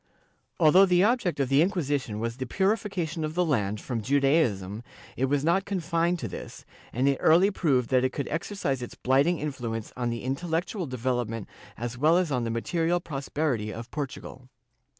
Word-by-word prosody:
Although 180 +4 +6
the 180 0 +4
object 210 - +1
of 135 - +1
the 135 +3 +4
Inquisition 145 - -1
was 115 +1 -3
the 130 -1 -4
purification 190 - -1
of 155 +1 -3
the 180 0 +2
land 105 -9 0
from 120 0 -4
Judaism, 125 - +1 0.3
it 130 - +1
was 140 +1 0
not 180 +4 +3
confined 175 -2 0
to - - -4
this, - - -9 0.3
and 130 +4 +1
it 140 -1 +2
early 180 +6 +5
proved 135 - +1
that 130 -1 +4
it 130 - +1
could 140 - -4
exercise 155 -5 -2
its 120 - -7
blighting 140 +7 +2
influence 120 -7 -4
on 125 -1 -1
the 115 0 -4
intel 140 +7 -3
lectual 175 +1 -2
development 120 -3 -2 0.3
as 120 +2 -5
well 160 +4 +5
as 180 -4 0
on 125 -3 0
the - - -2
material 165 +9 0
prosperity 140 -7 -2
of 115 +2 -8
Portugal. 130 -3 -6
140 Hz, 180 wpm, -27 LUFS, 125-170 Hz, 0.3 s, Although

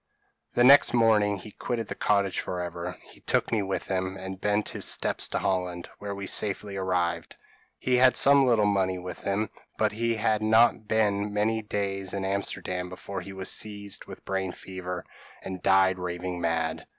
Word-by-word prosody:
p> - - -43
"The 120 - +4
next 140 -1 +7
morning 105 -3 +3
he 105 +3 -11
quitted 115 +1 -4
the - - -4
cottage 100 -2 +1
for 90 - -4
ever. 85 +1 -5
He - - -17
took - - 0
me 110 -3 +2
with 95 -1 -3
him, 95 0 -2
and 95 0 -7
bent 105 0 +1
his - - -2
steps - - +2
to - - -1
Holland, 90 -2 -2
where 100 0 -5
we 100 0 -6
safely 100 0 0
arrived. 90 -3 -1 0.4
He 125 -1 +1
had 130 0 +5
some 140 -1 +6
little 115 -4 +4
money 95 -2 +1
with 90 0 -7
him; 100 +2 -1 0.3
but 110 -1 +2
he 115 +2 -1
had 110 0 +1
not 110 0 +4
been 105 -1 +1
many 110 +2 0
days 100 -2 -3
in 95 -1 -2
Amsterdam 90 -2 -2
before 95 +1 -6
he 100 +2 -9
was 95 -1 -2
seized 100 -2 -3
with - - -9
a - - -27
brain 95 -2 -2
fever, 90 -1 -7 0.4
and 95 -1 -6
died 95 -1 +4
raving 90 0 -4
mad. 80 -1 -1
100 Hz, 185 wpm, -27 LUFS, 95-105 Hz, 0.4 s, next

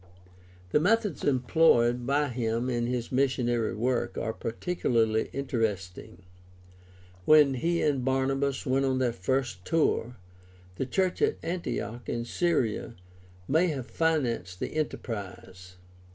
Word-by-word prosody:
— 90 0 -25
The - - +4
methods 205 - +1
employed 125 -3 +3
by 145 +1 +2
him 120 0 -1
in 120 -1 -1
his 120 -1 -3
missionary 125 -4 +1
work 120 +2 -1
are 110 - -2
particularly 115 -4 0
interesting. 110 -7 -3 1.0
When 150 -3 +6
he 170 +7 0
and 140 -4 +1
Barnabas 135 +1 0
went 135 +1 +1
on 130 -1 +1
their 125 -2 +1
first 115 -1 -2
tour, 125 - 0 0.6
the 130 - -2
church 185 +3 0
at 435 0 +2
Antioch 125 -8 -4
in 120 0 -2
Syria 125 -7 -1 0.5
may 160 +6 +3
have 140 -7 -3
financed 120 - -1
the - - -4
enterprise 115 -9 -3
(Acts 95 - -13
13: - - -13
2 - - -15
f 90 0 -15
125 Hz, 140 wpm, -28 LUFS, 115-145 Hz, 1.0 s, When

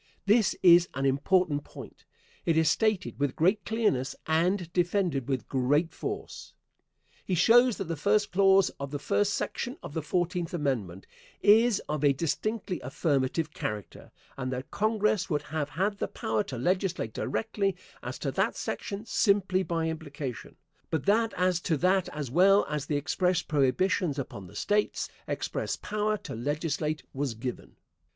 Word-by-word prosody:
This 215 +1 +3
is 175 -1 +7
an 135 +1 -1
important 145 +2 +2
point. - - -12 0.4
It 165 -1 +1
is 160 -1 +4
stated 215 -8 0
with 140 -2 0
great 190 +6 +2
clearness, 210 - 0
and 170 +2 +1
defended 175 - 0
with 130 -2 -2
great 145 +5 +1
force. 410 - -6 0.7
He 185 - -1
shows 240 +6 +5
that - - -2
the 165 -2 -4
first 205 +7 +1
clause 195 0 +4
of 140 0 -4
the 145 - -3
first 200 +7 +1
section 250 +5 -3
of - - -8
the 160 - -2
Fourteenth 175 +2 -1
Amendment 115 - -2 0.4
is 220 +1 +5
of 150 -1 -2
a 140 -1 +5
distinctly 185 +6 -2
affirmative 145 +2 -1
character, 105 -1 -6 0.3
and 130 -1 -3
that 130 +1 -5
Congress 215 -2 +1
would 150 -3 0
have 150 -1 -3
had 200 +7 -1
the - - -1
power 110 0 -1
to 130 - -6
legislate 180 - -1
directly 195 - -1 0.3
as - - -5
to - - -3
that - - 0
section 200 +2 -4
simply 195 -4 +2
by 165 -3 -1
implication, 145 -8 -6 0.3
but 160 -4 -2
that 225 +3 +3
as 180 -1 +2
to 165 -3 0
that 185 +4 +2
as 145 -5 -5
well 195 +6 +5
as 150 -2 -3
the 145 - 0
express 180 +3 0
prohibitions 150 +3 +1
upon 100 -8 -6
the - - -15
States, 210 0 0 0.2
express - - -2
power 215 0 -1
to - - -8
legislate 150 +4 -2
was 135 -3 -2
given. 125 +3 -6
165 Hz, 160 wpm, -28 LUFS, 140-195 Hz, 0.7 s, is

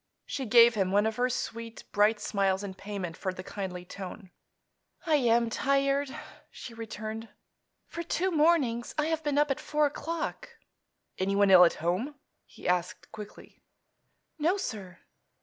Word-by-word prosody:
She 265 -3 -4
gave 235 +1 +7
him 195 -4 0
one 205 +2 +3
of 220 0 -1
her 250 +1 +2
sweet, 230 -2 -5
bright 210 +1 +3
smiles 195 -2 0
in 195 -1 -5
payment 190 -3 -6
for 190 - -3
the 185 0 -8
kindly 180 -2 -6
tone. 190 +1 -9 0.7
"I 315 -3 +4
am 235 -3 +3
tired," 275 +2 +1 0.4
she 235 - -10
returned. 220 0 -6 0.6
"For 340 - -6
two 355 +2 -1
mornings 295 -8 +2
I 300 - +2
have 320 -1 -1
been 295 -1 0
up 295 -1 +3
at 275 - -1
four 300 0 +1
o'clock." 335 - -4 0.6
"Anyone 200 +1 +3
ill 180 -1 +9
at 170 - +2
home?" 215 - -1 0.3
he - - -9
asked 180 0 -1
quickly. 210 -1 -11 0.8
"No, 340 +6 +2
sir." 195 - -6
225 Hz, 150 wpm, -29 LUFS, 195-285 Hz, 0.8 s, ill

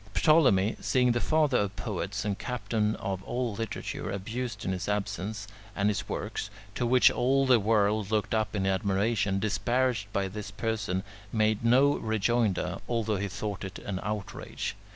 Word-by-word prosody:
Ptolemy, 105 - +4
seeing 125 -1 +3
the 120 - +1
father 150 -2 +2
of 100 0 -1
poets 100 -2 -3
and 100 -1 -2
captain 110 -4 -1
of 95 -1 -4
all 120 +2 -2
literature 115 +2 -4
abused 110 +2 -4
in - - 0
his 90 +1 -3
absence, 105 0 -2 0.3
and 100 +1 +2
his 105 - -2
works, - - -3 0.2
to 120 - -1
which 125 0 +6
all 135 +2 +2
the 125 -3 +5
world 105 -1 +2
looked 110 0 0
up 110 -1 0
in 95 -2 0
admiration, 95 +1 +1
disparaged 110 +1 0
by 100 -2 0
this 105 +2 -6
person, 105 -5 -2 0.3
made 110 -1 +1
no 130 +5 +5
rejoinder, 110 -1 0
although 110 -3 0
he 100 +1 -2
thought 100 +1 -4
it 95 -1 -6
an 95 -2 -4
outrage. 105 -1 -4
105 Hz, 160 wpm, -29 LUFS, 100-120 Hz, 0.3 s, which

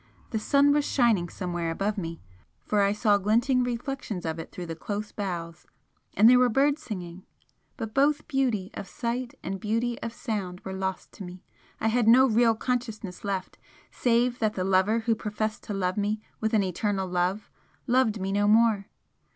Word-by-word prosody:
The 220 - -1
sun 280 +5 +4
was 295 0 +2
shining 225 -11 +2
somewhere 175 -2 -3
above 200 +6 -1
me, 165 -4 -5 0.5
for 210 -1 +2
I 200 0 +3
saw 210 -1 +3
glinting 240 +6 +2
reflections 240 -5 -4
of 160 0 -3
it 165 - -8
through 180 - -6
the 165 -1 -5
close 205 +5 -5
boughs, 175 -4 -5 0.5
and 215 +3 +6
there 250 +1 +7
were 250 -1 +4
birds 280 +5 +2
singing. 180 -5 -7 0.5
But 225 -4 -5
both 290 +3 +2
beauty 240 -9 0
of 195 - -7
sight 240 +1 -3
and 190 +1 -4
beauty 230 +3 -1
of 230 - -4
sound 200 -7 -4
were 190 - -6
lost 190 0 -4
to 200 - -10
me 180 0 -10 0.4
I 225 - +1
had 235 0 +1
no 250 +3 +7
real 230 -1 +3
consciousness 225 -6 -3
left 195 -2 -4 0.3
save 245 0 +1
that 215 -2 0
the 185 - -1
lover 195 +4 +2
who 225 0 +2
professed 215 0 -3
to 210 - -4
love 185 0 -1
me 210 +1 0 0.2
with 220 0 0
an 210 - +3
eternal 190 +1 -1
love 180 +3 -1 0.3
loved 245 -4 +2
me 190 0 -2
no 205 +1 +2
more! 215 -2 +4
215 Hz, 185 wpm, -27 LUFS, 190-235 Hz, 0.5 s, there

